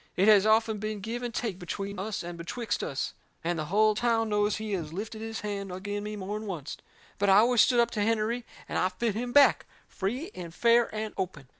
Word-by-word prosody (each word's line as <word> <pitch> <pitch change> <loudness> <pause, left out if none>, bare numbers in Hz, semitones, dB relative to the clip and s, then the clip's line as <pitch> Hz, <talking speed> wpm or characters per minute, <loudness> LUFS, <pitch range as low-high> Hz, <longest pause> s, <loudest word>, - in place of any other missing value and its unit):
It 190 +3 +3
has 210 -1 +6
often 220 0 +3
been 215 0 -3
give 230 +5 -4
and 240 -1 -3
take 220 -5 -3
between 200 +2 -5
us 205 0 -3
and 175 0 -6
betwixt 205 +6 -3
us. 135 - -3 0.3
And 170 0 -1
the 155 - -2
hull 215 +6 +3
town 225 0 +1
knows 210 0 +2
he 215 -1 -5
has 165 -5 -3
lifted 215 +5 -6
his 225 0 -5
hand 200 -2 -4
agin 205 +3 -4
me 210 0 -5
more'n 210 +2 -5
oncet. 155 -6 -5 0.4
But 200 0 +2
I 190 - +7
always 235 +2 +5
stood 245 0 +4
up 235 0 +3
to 215 - -3
Hennerey, 225 +2 0 0.2
and - - -1
I 185 - +2
fit 215 +4 -1
him 245 +4 -3
back, 285 +2 +5 0.2
free 250 - -3
and 170 -2 -8
fair 235 0 +4
and 215 0 -4
open. 150 -8 -4
210 Hz, 225 wpm, -28 LUFS, 190-225 Hz, 0.4 s, I